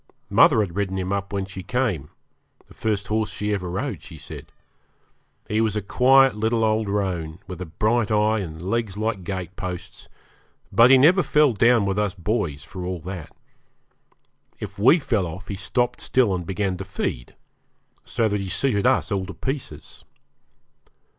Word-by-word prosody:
Mother 110 Hz, -, +6 dB
had 90 Hz, -5 st, -3 dB
ridden 95 Hz, -2 st, -1 dB
him 95 Hz, +1 st, -2 dB
up 100 Hz, 0 st, -3 dB
when 100 Hz, -1 st, -2 dB
she 95 Hz, 0 st, -8 dB
came 100 Hz, -, -1 dB, 0.6 s
the -, -, -17 dB
first 105 Hz, -2 st, -2 dB
horse 110 Hz, 0 st, 0 dB
she 105 Hz, +1 st, -2 dB
ever 90 Hz, -3 st, -3 dB
rode, 120 Hz, +10 st, -3 dB
she 80 Hz, -, -11 dB
said. -, -, -10 dB, 1.0 s
He 110 Hz, +1 st, +1 dB
was 110 Hz, -2 st, 0 dB
a 105 Hz, -, 0 dB
quiet 135 Hz, +5 st, +5 dB
little 110 Hz, +1 st, +1 dB
old 110 Hz, -1 st, +1 dB
roan, 90 Hz, -6 st, -2 dB
with 90 Hz, -1 st, -8 dB
a 90 Hz, -, -5 dB
bright 110 Hz, +7 st, 0 dB
eye 110 Hz, 0 st, +2 dB
and 80 Hz, -5 st, -6 dB
legs 100 Hz, +2 st, -2 dB
like 110 Hz, -3 st, -2 dB
gate 95 Hz, 0 st, -5 dB
posts, 90 Hz, -3 st, -7 dB, 0.6 s
but 115 Hz, +2 st, +6 dB
he 135 Hz, -, +8 dB
never 170 Hz, +9 st, +6 dB
fell 150 Hz, -6 st, +3 dB
down 115 Hz, 0 st, +4 dB
with 100 Hz, +1 st, 0 dB
us 105 Hz, -3 st, -1 dB
boys, 90 Hz, -6 st, -2 dB
for 90 Hz, +3 st, -8 dB
all 90 Hz, 0 st, -3 dB
that. 90 Hz, -1 st, -7 dB, 1.3 s
If -, -, -7 dB
we 130 Hz, -, +6 dB
fell 110 Hz, -, 0 dB
off 90 Hz, +5 st, -9 dB
he 100 Hz, -, -3 dB
stopped 120 Hz, +6 st, -1 dB
still 120 Hz, -7 st, +2 dB
and 90 Hz, -2 st, -4 dB
began 95 Hz, -1 st, -1 dB
to 95 Hz, -, -5 dB
feed, -, -, -4 dB, 0.7 s
so 115 Hz, -2 st, 0 dB
that 105 Hz, -1 st, -1 dB
he 95 Hz, -, -5 dB
suited 125 Hz, -1 st, +1 dB
us 130 Hz, -3 st, +2 dB
all 95 Hz, -2 st, -1 dB
to -, -, -8 dB
pieces. 135 Hz, 0 st, -6 dB
100 Hz, 175 wpm, -23 LUFS, 95-115 Hz, 1.3 s, he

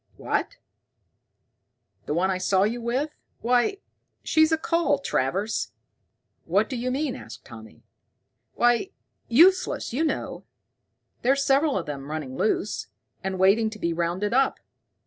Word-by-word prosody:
"What, -, -, -2 dB, 1.5 s
the 150 Hz, -, -1 dB
one 190 Hz, +3 st, +2 dB
I 185 Hz, -, -1 dB
saw 190 Hz, +1 st, +2 dB
you 235 Hz, +4 st, -1 dB
with? 255 Hz, +6 st, -1 dB, 0.3 s
Why, 245 Hz, -, +2 dB, 0.5 s
she's 315 Hz, 0 st, +3 dB
a 320 Hz, -, +3 dB
cull, 335 Hz, -2 st, +1 dB
Travers." 195 Hz, -, -1 dB, 0.7 s
"What -, -, +2 dB
d'you 250 Hz, 0 st, -2 dB
mean?" 275 Hz, +1 st, -1 dB
asked -, -, -11 dB
Tommy. 110 Hz, -8 st, -13 dB, 0.7 s
"Why 240 Hz, +9 st, +2 dB, 0.4 s
useless, 345 Hz, +3 st, +4 dB
you 290 Hz, +6 st, +1 dB
know. 315 Hz, -, -2 dB, 0.8 s
There's 275 Hz, +3 st, +2 dB
several 275 Hz, 0 st, +3 dB
of 180 Hz, -, -3 dB
them 140 Hz, -1 st, -6 dB
running 150 Hz, -4 st, -5 dB
loose, 210 Hz, +3 st, -1 dB, 0.4 s
and 190 Hz, 0 st, -2 dB
waiting 200 Hz, +4 st, +4 dB
to 215 Hz, -, -9 dB
be 170 Hz, -4 st, -1 dB
rounded 175 Hz, +5 st, -1 dB
up. 265 Hz, +1 st, +2 dB
230 Hz, 130 wpm, -25 LUFS, 185-275 Hz, 1.5 s, useless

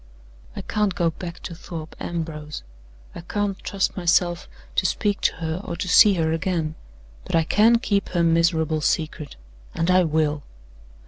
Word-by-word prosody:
"I -, -, -5 dB
can't 210 Hz, -3 st, 0 dB
go 170 Hz, -4 st, +1 dB
back 170 Hz, +1 st, -8 dB
to 170 Hz, -, -7 dB
Thorpe 160 Hz, -1 st, -8 dB
Ambrose; 155 Hz, -3 st, -5 dB, 0.5 s
I 170 Hz, -, -8 dB
can't 200 Hz, +2 st, -2 dB
trust 195 Hz, -1 st, -1 dB
myself 175 Hz, -1 st, +1 dB, 0.3 s
to -, -, +3 dB
speak 205 Hz, -2 st, -1 dB
to -, -, +1 dB
her, 165 Hz, +1 st, -4 dB
or 170 Hz, -, -5 dB
to 180 Hz, +2 st, -4 dB
see 200 Hz, +2 st, +7 dB
her 160 Hz, -2 st, 0 dB
again. 165 Hz, -2 st, -1 dB, 0.5 s
But -, -, -3 dB
I 165 Hz, -, +4 dB
can 220 Hz, +8 st, +4 dB
keep 200 Hz, -4 st, -1 dB
her 175 Hz, -2 st, +1 dB
miserable 165 Hz, -1 st, +2 dB
secret; 155 Hz, -1 st, -2 dB, 0.4 s
and 165 Hz, +2 st, +1 dB
I 185 Hz, -1 st, +5 dB
will!" 155 Hz, -2 st, 0 dB
170 Hz, 165 wpm, -23 LUFS, 160-185 Hz, 0.5 s, see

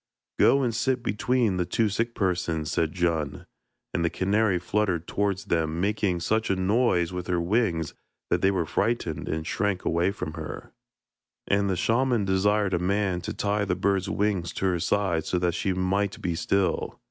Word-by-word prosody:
'Go 140 Hz, 0 st, +5 dB
and 120 Hz, -2 st, 0 dB
sit 120 Hz, +2 st, 0 dB
between 110 Hz, -1 st, +1 dB
the 90 Hz, -, 0 dB
two 115 Hz, -, +1 dB
sick 115 Hz, +3 st, -1 dB
persons,' 85 Hz, -5 st, -1 dB
said 80 Hz, -2 st, +1 dB
Djun, 85 Hz, -4 st, -1 dB, 0.5 s
and 85 Hz, -, 0 dB
the 85 Hz, -, +2 dB
canary 100 Hz, +1 st, +1 dB
fluttered 90 Hz, -2 st, 0 dB
towards 100 Hz, -1 st, -1 dB
them, 80 Hz, -1 st, 0 dB
making 95 Hz, -2 st, 0 dB
such 110 Hz, +5 st, 0 dB
a 95 Hz, -, +2 dB
noise 95 Hz, -2 st, +2 dB
with 90 Hz, -1 st, -4 dB
her 90 Hz, -1 st, +1 dB
wings 85 Hz, -3 st, 0 dB, 0.4 s
that -, -, +2 dB
they 95 Hz, -, +4 dB
were 95 Hz, -4 st, 0 dB
frightened 90 Hz, -4 st, -1 dB
and 80 Hz, 0 st, -2 dB
shrank 100 Hz, 0 st, -1 dB
away 85 Hz, +3 st, +2 dB
from 100 Hz, -6 st, -5 dB
her. 80 Hz, -2 st, -7 dB, 0.7 s
And 100 Hz, 0 st, +2 dB
the 95 Hz, -, +1 dB
shaman 115 Hz, +3 st, +1 dB
desired 100 Hz, +1 st, +2 dB
a 90 Hz, -, +2 dB
man 95 Hz, 0 st, 0 dB
to -, -, -4 dB
tie 105 Hz, 0 st, 0 dB
the 95 Hz, -, 0 dB
bird's 95 Hz, 0 st, 0 dB
wings 95 Hz, -4 st, 0 dB
to -, -, -2 dB
her 90 Hz, -2 st, +1 dB
side 85 Hz, -3 st, 0 dB
so 90 Hz, -, 0 dB
that 90 Hz, -1 st, +1 dB
she 95 Hz, +3 st, -1 dB
might 95 Hz, +2 st, 0 dB
be 85 Hz, -, -2 dB
still. 95 Hz, +3 st, 0 dB
95 Hz, 180 wpm, -26 LUFS, 85-105 Hz, 0.7 s, Go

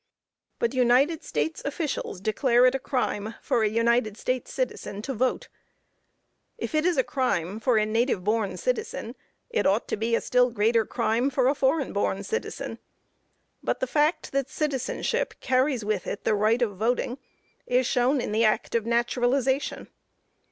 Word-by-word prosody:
But 235 Hz, +1 st, 0 dB
United 260 Hz, +6 st, +3 dB
States 150 Hz, +1 st, -2 dB
officials 285 Hz, -, -3 dB
declare 240 Hz, +4 st, +3 dB
it 255 Hz, -, +5 dB
a 270 Hz, -, -1 dB
crime 230 Hz, -5 st, -2 dB
for 235 Hz, -, 0 dB
a 215 Hz, -, +3 dB
United 230 Hz, -1 st, +1 dB
States 255 Hz, +1 st, -2 dB
citizen 210 Hz, -, -3 dB
to 270 Hz, -, -3 dB
vote. 255 Hz, +2 st, 0 dB, 1.1 s
If 440 Hz, -, -5 dB
it 310 Hz, +2 st, +2 dB
is 350 Hz, -4 st, +1 dB
a 260 Hz, -, +4 dB
crime 210 Hz, -, -1 dB
for 235 Hz, 0 st, +2 dB
a 215 Hz, -, +3 dB
native 225 Hz, -2 st, 0 dB
born 215 Hz, 0 st, 0 dB
citizen, -, -, -3 dB, 0.4 s
it 465 Hz, -, +1 dB
ought 200 Hz, +4 st, +1 dB
to -, -, 0 dB
be 230 Hz, +2 st, +1 dB
a -, -, 0 dB
still 250 Hz, 0 st, +3 dB
greater 225 Hz, 0 st, +2 dB
crime 235 Hz, +5 st, +1 dB
for 260 Hz, -2 st, +1 dB
a 275 Hz, -, +4 dB
foreign 275 Hz, 0 st, +1 dB
born 200 Hz, -1 st, -1 dB
citizen. 455 Hz, -, -4 dB, 0.8 s
But -, -, -1 dB
the -, -, 0 dB
fact 305 Hz, -4 st, +1 dB
that 275 Hz, -1 st, -1 dB
citizenship 305 Hz, -, -2 dB
carries 255 Hz, -3 st, +1 dB
with 210 Hz, -3 st, -1 dB
it 200 Hz, -, -4 dB
the -, -, +2 dB
right 215 Hz, +4 st, +2 dB
of 205 Hz, -5 st, -2 dB
voting, 245 Hz, +4 st, -1 dB, 0.5 s
is 250 Hz, +1 st, +2 dB
shown 255 Hz, +3 st, +2 dB
in -, -, -3 dB
the 220 Hz, +2 st, +2 dB
act 215 Hz, -1 st, +1 dB
of 230 Hz, -1 st, 0 dB
naturalization. 245 Hz, +3 st, 0 dB
245 Hz, 165 wpm, -26 LUFS, 220-270 Hz, 1.1 s, it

